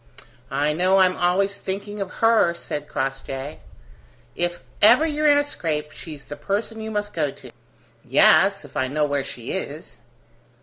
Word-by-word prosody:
"I 145 +3 0
know 185 +4 +3
I'm 185 -1 +4
always 195 +3 +1
thinking 200 +2 -4
of 195 - -3 0.2
her," 220 -7 +4
said 150 -3 -5
Crossjay. 135 +1 -4 0.8
"If 175 0 -1 0.2
ever 245 +9 +7
you're 305 -1 0
in 290 -1 +6
a 290 - +3
scrape, 155 - -3
she's 155 -2 -10
the 145 - -7
person 205 +8 -3
you 220 - -5
must 210 -1 -3
go 155 -3 0
to." - - -12 0.5
"Yes, - - +4
if - - -16
I 130 - 0
know 150 +3 0
where 145 -1 -1
she 120 -3 -7
is!" - - -5
175 Hz, 165 wpm, -23 LUFS, 150-205 Hz, 0.8 s, ever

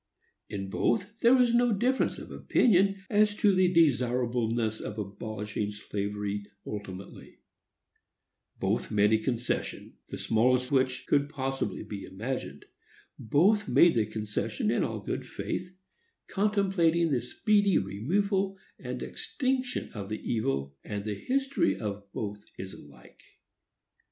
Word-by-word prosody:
In 95 -1 -5
both 205 - 0
there 235 +3 +6
was 250 -2 +4
no 240 0 +4
difference 250 +6 +1
of - - -9
opinion 195 -3 +3
as 210 0 +3
to 210 -2 +4
the 185 -1 +4
desirableness 120 -7 +2
of 105 - -6
abolishing 105 0 -4
slavery 105 0 -4 0.2
ultimately; 100 -2 -8 1.2
both - - 0
made 105 +1 +3
a 110 - +4
concession, 120 +1 -3
the - - -6
smallest 125 +3 +2
which 130 -2 +1
could 140 0 +2
possibly 135 -2 -3
be 100 -2 -7
imagined; 115 +8 -5 0.5
both 190 - +3
made 175 - +6
the 110 -3 +1
concession 105 -1 -2
in - - +2
all - - -3
good - - -4
faith, 180 - -4 0.6
contemplating 190 -5 +2
the 125 -4 +2
speedy 205 - +2
removal 190 - 0 0.2
and - - -5
extinction 260 -2 -2
of 100 -2 -6
the 110 - -5
evil; 70 - -1
and 100 -1 -5
the 105 - -1
history 270 - 0
of 100 -2 -5
both 105 -1 -5
is 95 0 -7
alike. 70 -4 -15
125 Hz, 125 wpm, -29 LUFS, -, 1.2 s, there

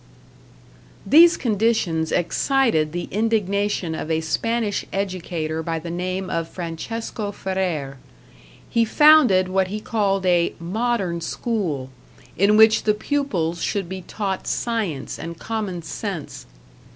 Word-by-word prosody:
These 335 +3 +7
conditions 205 -8 0
excited 175 - +1
the 175 +1 -4
indignation 205 -4 0
of 160 - -5
a 160 0 +1
Spanish 225 +6 -1
educator 175 -5 -3
by 165 0 -2
the 165 +1 -6
name 185 +2 -3
of 165 -2 -2
Francesco 200 +6 -5
Ferrer. 180 -9 -3 0.7
He 230 - +2
founded 250 -7 +5
what 190 0 +1
he 210 +3 -4
called 200 -3 0
a 175 -2 +2
"modern 190 -1 -1
school", 165 - -3 0.4
in 200 +3 +4
which 220 0 +6
the 210 -1 +3
pupils 205 - -1
should 200 -4 -1
be 190 +1 -6
taught 195 +1 -4
science 210 - -2
and 170 0 -6
common 205 -4 -4
sense. 175 -1 -6
190 Hz, 120 wpm, -22 LUFS, 170-220 Hz, 0.7 s, These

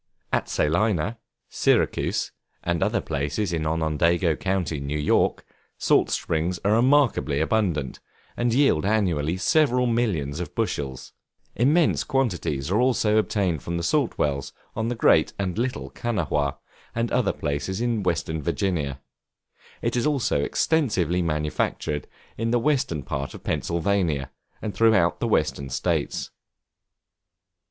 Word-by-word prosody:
At - - 0
Salina, 100 +5 +1 0.3
Syracuse, - - +1 0.3
and 85 -1 -1
other - - +1
places 75 +7 -2
in 80 -2 -1
Onondaga 80 +1 +1
Co., 95 +3 0
New 70 -1 -3
York, 75 - +1 0.3
salt - - +3
springs 85 +2 -1
are 100 - +3
remarkably 120 - +3
abundant, 80 - 0 0.4
and 120 0 0
yield 130 - +3
annually 90 -6 +1
several 125 - +3
millions 95 - 0
of 90 - -6
bushels; 65 -3 -3 0.4
immense 145 +8 +3
quantities 90 - -1
are 105 +4 +3
also 115 -4 +2
obtained 95 -8 0
from 85 0 -3
the 85 - -3
salt 140 - +1
wells 70 -2 -1 0.2
on 110 0 -1
the 120 - -1
Great - - +4
and 100 +1 -2
Little 130 +2 -2
Kanawha, 75 - -1 0.4
and 115 0 -1
other 125 0 +2
places 75 +6 -3
in 120 -2 0
Western 80 -3 -1
Virginia; 75 -4 -1 0.8
it - - 0
is 120 +3 +1
also 135 - +1
extensively 95 - +1
manufactured 75 -2 -1 0.3
in 115 0 0
the 120 - +3
western 120 - 0
part 70 +2 -4
of - - -11
Pennsylvania, 85 -5 0 0.3
and 105 - -3
throughout 110 -7 +3
the - - 0
Western 70 -1 0
States. 65 - -1
90 Hz, 130 wpm, -25 LUFS, 75-115 Hz, 0.8 s, Great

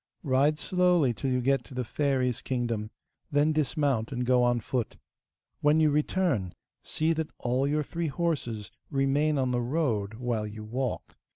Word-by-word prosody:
Ride 145 +1 +3
slowly 180 -7 +2
till 135 +4 -3
you 125 -1 +1
get 135 +2 +2
to 135 - -12
the 125 - -1
fairy's 130 -2 0
kingdom, 120 -4 -2 0.4
then 145 +2 +3
dismount 140 -6 0
and 125 -1 -2
go 125 0 +4
on 120 -1 +3
foot. 120 0 -3 0.6
When 150 +2 +4
you 155 -1 +4
return, 150 - 0 0.3
see 160 +1 0
that 160 -1 -2
all 125 +3 0
your 150 +1 +1
three 165 +3 -3
horses 135 - -2 0.2
remain 145 +2 +2
on 130 -2 +1
the 120 -1 +1
road, 120 -7 -1
while 115 -3 -2
you 105 +1 -8
walk. 125 +4 -4
135 Hz, 165 wpm, -28 LUFS, 120-150 Hz, 0.6 s, go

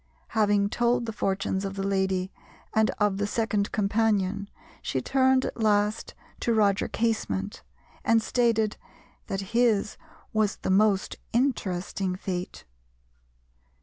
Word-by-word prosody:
Having 205 -2 +2
told 240 +2 +1
the 225 - -4
fortunes 195 -1 -1
of 195 0 -4
the 195 0 -2
lady 190 -1 0 0.4
and 220 0 +3
of 205 -2 +1
the 205 - 0
second 210 -2 0
companion, 205 -1 +1 0.3
she 130 - -1
turned 260 - +3
at 235 - -5
last 210 0 +1 0.2
to 235 - +1
Roger 205 -2 +3
Casement, 220 -3 -2 0.4
and 230 0 +4
stated 225 -2 +1 0.5
that 195 +1 -4
his 230 -3 +2 0.4
was 215 -2 +2
the - - -3
most 200 0 +2 0.2
interesting 195 -7 0
fate. 180 -1 -5
205 Hz, 120 wpm, -27 LUFS, 195-225 Hz, 0.5 s, and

